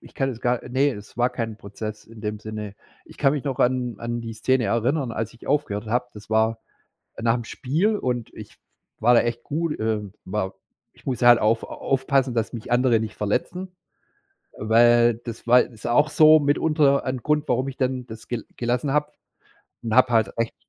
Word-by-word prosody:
ich - - -17
kann 135 - 0
es 115 -3 -8
gar 125 0 +1
Ne, 135 +2 +1
das 105 0 -12
war 120 +1 +2
kein 115 -3 -4
Prozess 105 +1 -7
in 110 -1 -14
dem 105 0 -4
Sinne. 105 -1 -7 0.3
Ich - - -15
kann 135 -1 +3
mich 150 -1 -3
noch 135 -1 -3
an 125 -2 +1
an 120 0 -3
die 115 -1 -7
Szene 130 +2 +1
erinnern, 125 +4 0
als 115 0 -4
ich 120 - -16
aufgehört 115 -7 -1
habe. 125 +2 -1
Das 105 -1 -13
war 110 +1 +2 0.6
nach 115 0 +2
'm 120 - -5
Spiel 160 - 0
und 120 - -3
ich - - -12 0.4
war 120 +2 +4
da 120 - +6
echt 120 0 -3
gut 160 +1 -2
ähm, 105 -3 -2
war 95 0 -3 0.4
Ich - - -23
musste 125 -2 +1
halt 120 -1 +8
auf 110 +1 +2
aufpassen, 135 -1 0
dass 115 -2 -1
mich 115 0 -7
andere 120 -2 +3
nicht 110 -1 -5
verletzen. 180 - -2 0.9
Weil 120 +2 +5
das 115 0 -8
war 125 +1 +7
ist 115 -3 -9
auch 145 +6 +3
so 155 0 +7
mitunter 145 -1 +2
ein 130 0 -2
Grund, 150 +4 0
warum 130 +1 +1
ich 135 - -7
dann 130 -1 -1
das 110 0 -10
gel 120 -2 -4
gelassen 125 +3 -1
habe 150 0 0 0.7
und 115 -2 -2
habe 130 -1 +5
halt 110 -3 +2
echt 115 0 -1
120 Hz, 195 wpm, -24 LUFS, 110-135 Hz, 0.9 s, halt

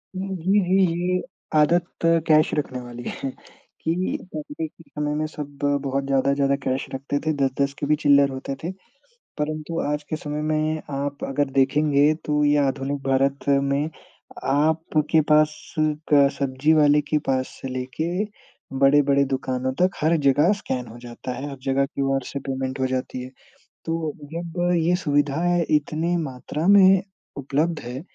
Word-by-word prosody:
उम, 190 0 -3
जी, 190 +4 +2
जी, 190 0 +3
जी, 180 +2 0 0.3
आदत 170 +3 +4 0.4
कैश 155 -1 +4
रखने 130 -4 -2
वाली 120 0 -9
है, 135 - -4 0.5
कि 170 +3 -1 0.2
पहले 155 +1 -5
के 165 - -19
समय 150 0 -2
में 155 0 -1
सब 145 -2 -8 0.3
बहुत 135 0 -1
ज़्यादा-ज़्यादा 140 0 +2
कैश 130 +1 -1
रखते 140 +2 -2
थे, 155 - +2
10-10 140 0 0
के - - -1
भी 150 - +4
चिल्लर 140 -1 +5
होते 135 +1 -5
थे। 175 - -2 0.7
परंतु 155 +2 -3
आज 150 0 -2
के 155 - -1
समय 150 0 -4
में 155 0 0
आप 140 +1 -4
अगर 140 0 0
देखेंगे, 145 +2 +4
तो 150 0 +1
ये 145 0 +4
आधुनिक 140 0 -1
भारत 135 +1 +1 0.2
में 140 +3 0 0.5
आपके 155 +2 +2
पास 150 0 +4 0.6
क 140 -1 +7
सब्ज़ी 140 +3 +1
वाले 150 -1 +5
के 155 - +4
पास 130 -1 +1
से - - -4
लेके, 155 +10 -2 0.5
बड़े-बड़े 140 0 +4
दुकानों 130 0 -2
तक 185 +1 +4
हर 165 +2 +3
जगह 150 +7 +4
स्कैन 125 -2 -3
हो 115 - -11
जाता 120 +1 -7
है, 145 +2 -5
हर 135 - -8
जगह 135 +1 +2
क्यूआर 135 -1 -1
से 140 - -3
पेमेंट 130 0 -3
हो 130 - +1
जाती 130 0 -3
है। 130 - -8 0.6
तो 165 -2 -2 0.2
जब 170 +1 -4 0.2
ये 170 +2 +2
सुविधा 145 -2 0 0.3
इतनी 160 +4 0
मात्रा 150 +1 -4
में 195 -2 +7 0.3
उपलब्ध 150 +4 -1
है, 125 +2 -5
145 Hz, 160 wpm, -23 LUFS, 135-155 Hz, 0.7 s, क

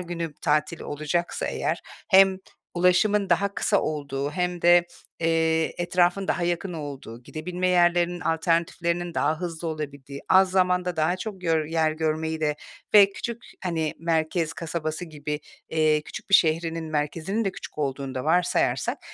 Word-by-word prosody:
Günü 170 -3 -5
tatili 150 +2 0
olacaksa 160 - -2
eğer - - -2 0.3
hem 190 -1 +6 0.4
ulaşımın 185 +3 +3
daha 200 +3 +2
kısa 200 - +2
olduğu 140 -2 -3
hem 180 0 -2
de, 175 0 +6 0.3
eee, 160 -1 +1
etrafın 180 +2 +1
daha 175 - 0
yakın 175 +2 -1
olduğu, 140 -6 -7
gidebilme 180 +6 -3
yerlerinin 175 0 +3
alternatiflerinin 170 +1 0
daha 155 +3 0
hızlı 165 -1 -4
olabildiği, 140 -3 -6
az 190 0 +5
zamanda 180 -2 +1
daha 160 +4 +1
çok 190 -1 -7
yor 160 -2 +1
yer 160 0 +1
görmeyi 160 0 -2
de 150 -1 0 0.4
ve 200 -1 +8
küçük, 235 +2 -6 0.2
hani, 160 -3 -1
merkez 165 0 0
kasabası 160 0 -4
gibi, 150 -2 -5 0.3
eee, 155 -1 +3
küçük 190 - -9
bir - - +5
şehrinin 165 0 +2
merkezinin 160 +8 -1
de 195 - -1
küçük - - -10
olduğunu 135 -2 -3
da 130 - -3
varsayarsak 175 +2 +1
165 Hz, 145 wpm, -25 LUFS, 155-180 Hz, 0.4 s, ve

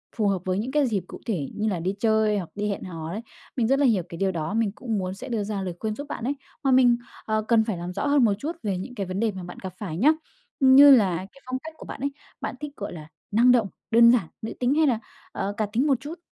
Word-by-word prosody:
phù 215 -3 +1
hợp 195 -3 +1
với 185 0 0
những 250 +5 -3
cái 290 -3 +3
dịp 200 -6 -1
cụ - - -9
thể 175 - -2
như 215 +1 -1
là 185 -5 0
đi 190 +4 -2
chơi 220 -2 +2
hoặc 180 -4 -4
đi 210 +1 -1
hẹn 200 - -3
hò 165 -3 -6
đấy. 210 +5 -4 0.3
Mình 230 -4 +1
rất 270 +2 +3
là 285 - +4
hiểu 205 -8 +3
cái 170 - -7
điều 195 0 +1
đó, 160 +2 -3
mình 225 -3 +1
cũng 225 0 -3
muốn 185 -1 -2
sẽ 250 +7 -9
đưa 220 -3 -1
ra 200 -1 -3
lời 180 -2 -3
khuyên 215 -1 -2
giúp 285 0 -7
bạn 235 - -6
ấy. 270 - 0 0.3
Mà 270 - +3
mình, 245 -2 +5 0.3
ờ, 215 0 +1
cần 230 -2 +4
phải 215 -5 -3
làm 175 +1 -5
rõ 285 - -2
hơn 285 -3 +4
một 210 - +4
chút 300 +8 -2
về 200 -4 -1
những 250 +7 -7
cái 200 - -2
vấn 185 +1 -4
đề 225 -1 +1
mà 185 -2 -7
bạn 175 - -9
gặp 185 -2 -5
phải 180 -6 -5
nhá. 275 - +5 0.5
Như 275 +1 +9
là 195 -10 +5
cái 275 - -20
phong 255 0 -3
cách 320 0 -8
của - - -10
bạn - - -8
ấy, 280 - -1 0.3
bạn - - -3
thích 295 -1 -6
gọi 200 - -5
là 155 -2 -9 0.2
năng 240 +4 +5
động, 230 -5 +4 0.2
đơn 235 +1 +7
giản, 230 -9 +2
nữ 220 - -4
tính 250 +3 +2
hay 315 -1 +4
là, 230 -4 +2 0.3
ờ, 200 +1 -3
cá 215 - +1
tính 235 +8 0
một 265 -3 +2
chút? 300 +5 -7
220 Hz, 295 wpm, -25 LUFS, 190-255 Hz, 0.5 s, Như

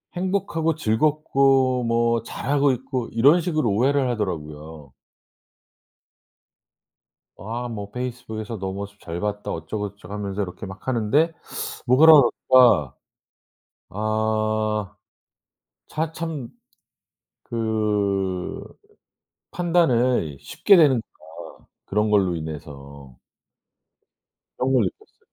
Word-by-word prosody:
행복하고 175 -3 -1
즐겁고 135 -1 +2
뭐 115 0 +1
잘하고 140 +3 0
있고 130 -1 -4
이런 140 +10 +5
식으로 155 -8 0
오해를 130 +5 +2
하더라고요. 80 - -5 2.5
"와 115 +6 -5
뭐 105 -3 -6
페이스북에서 120 -3 -5
너 95 0 -4
모습 100 +1 -7
잘 85 0 -6
봤다." 105 +1 -3
어쩌고저쩌고 100 +3 -6
하면서 100 -1 -3
이렇게 95 +2 -7
막 95 +6 -11
하는데 130 +7 +2 0.5
뭐 125 - +4
그런 160 +2 +9
엇 - - +1 0.2
가 120 - +5 1.0
아 110 -1 -1 1.0
차 160 +1 -3
참 160 -7 -5 1.0
그 105 -5 -1 0.9
'판단을 130 - +1
쉽게 200 - +3
내리는구나, 135 -8 +4 0.8
그런 105 +2 0
걸로 95 -4 +2
인해서' 70 -4 -9 1.4
그런 130 +1 0
걸 125 -4 +3
느꼈어요. 95 - -8
110 Hz, 210 characters per minute, -23 LUFS, 100-130 Hz, 2.5 s, 그런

